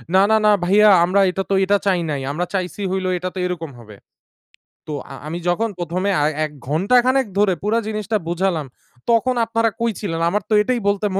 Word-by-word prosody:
"না, 190 - +6
না, 220 - +5
না, 210 - +6
ভাইয়া 210 +3 +5 0.2
আমরা 195 +3 +2
এটা 195 +1 -3
তো, - - +1
এটা 205 +1 +3
চাই 185 -3 +2
নাই। 140 -2 -3
আমরা 175 +4 -2
চাইছি 185 +1 -3
হইলো 190 -1 -1
এইটা 180 +1 -3
তো - - -7
এইরকম 165 -4 -4
হবে।" 105 -3 -14 0.9
তো - - -3 0.2
আ - - -7
আমি 170 +3 -4
যখন 225 +6 0
প্রথমে 180 +4 -2
আ - - +3 0.2
১ 150 - -8 0.2
ঘন্টা 190 - +2
খানেক 260 -2 +2
ধরে 200 -3 +3
পুরা 220 +3 +1
জিনিসটা 215 0 -2
বোঝালাম, 175 -4 -1 0.5
তখন 245 +2 +2
আপনারা 230 0 +1
কই 235 -1 +1
ছিলেন? 165 -6 -3
আমার 205 +1 -1
তো - - +1
এটাই 245 +2 0
বলতে 200 +1 +1
195 Hz, 205 wpm, -20 LUFS, 175-215 Hz, 0.9 s, না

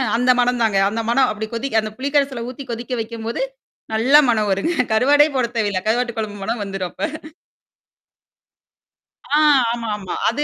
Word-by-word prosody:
அந்த 250 +2 +3
மணம் 245 0 +2
தாங்க. 215 -3 +2
அந்த 225 +2 -2
மணம் 255 0 +3
அப்டி 215 +1 -5
கொதி 240 +4 -2
அந்த 215 0 -3
புளிக்கரல்ல 275 -3 0
ஊத்தி 260 +1 -9
கொதிக்க 240 +2 -5
வைக்கும்போது, 230 - -5 0.5
நல்லா 260 +7 +5
மனம் 215 -3 +1
வருங்க. 195 - 0 0.2
கருவாடே 290 +6 +5
போட 250 - +2
தேவையில்ல. 200 -4 0
கருவாட்டு 235 +1 0
குழம்பு 210 -2 -4
மனம் 225 +1 -3
வந்துரும் 195 -2 -4
அப்ப. 310 0 -6 2.0
ஆ 295 - +4 0.3
ஆமா, 235 -1 -4
ஆமா. 190 -3 -6
அது 290 +6 -2
235 Hz, 155 wpm, -20 LUFS, 215-265 Hz, 2.0 s, நல்லா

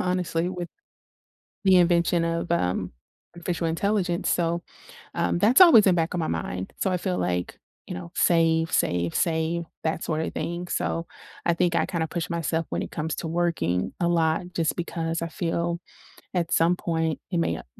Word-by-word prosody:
honestly, 180 -2 0
with 180 -2 -5 1.0
the 190 -1 +6
invention 170 -1 +3
of, 165 +1 -1
um, 90 - 0 0.4
artificial 170 -1 -2
intelligence, 180 +1 0
so, 170 0 +1 0.5
um, 85 0 0
that's 250 - +5
always 280 - +9
in 180 - +5
back 165 0 0
of 175 - -1
my 160 - -1
mind. 90 +3 -3
So, - - +2
I - - +2
feel 180 0 -2
like, 90 0 -2 0.3
you - - -6
know, 85 -1 -8
save, 165 -1 +3
save, 85 -1 +1
save, 165 0 0 0.2
that 160 +1 -1
sort 155 -1 -1
of - - -5
thing. 175 +1 -4
So, 165 - -1 0.4
I 170 - +3
think 170 0 +1
I - - +2
kinda 165 -3 -2
push 170 +2 -4
myself 165 -1 -1
when - - -2
it - - -6
comes 155 +1 -3
to 165 - -4
working 165 - 0
a 170 - +2
lot 170 +2 +1
just 165 -2 0
because 165 -1 -2
I 170 - -2
feel 170 -1 -2 0.5
at 170 -3 -1
some 170 +2 +4
point, 160 -3 -1
it 175 - 0
may 165 - +1
not - - -9
170 Hz, 180 wpm, -25 LUFS, 160-175 Hz, 1.0 s, always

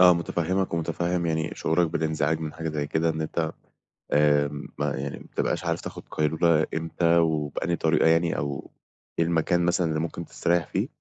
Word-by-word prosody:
آه، 90 -1 +9
متفهّمك 85 +2 -1
ومتفهم 85 +1 -1
يعني 80 -1 0
شعورك 85 +2 +2
بالإنزعاج 80 -1 0
من 80 -1 -4
حاجة 80 0 -4
زي 75 -2 -2
كده 80 +3 +1
إن 80 0 -3
أنت 80 0 -1 0.6
آآ، 75 -1 +4 0.3
ما - - -1
يعني 70 +1 -4
ما - - -13
بتبقاش - - -2
عارف - - -1
تاخد - - -7
قيلولة 80 +1 +2
إمتى 85 +1 +1
وبأنهى 80 +1 +1
طريقة 80 -1 +3
يعني، 80 +1 +3
أو 70 0 -4 0.5
إيه 85 - +4
المكان 85 +1 +2
مثلًا 85 0 +2
اللي 80 0 0
ممكن 85 +1 -4
تستريح 85 -2 0
فيه - - -1
80 Hz, 175 wpm, -26 LUFS, 80-85 Hz, 0.6 s, آه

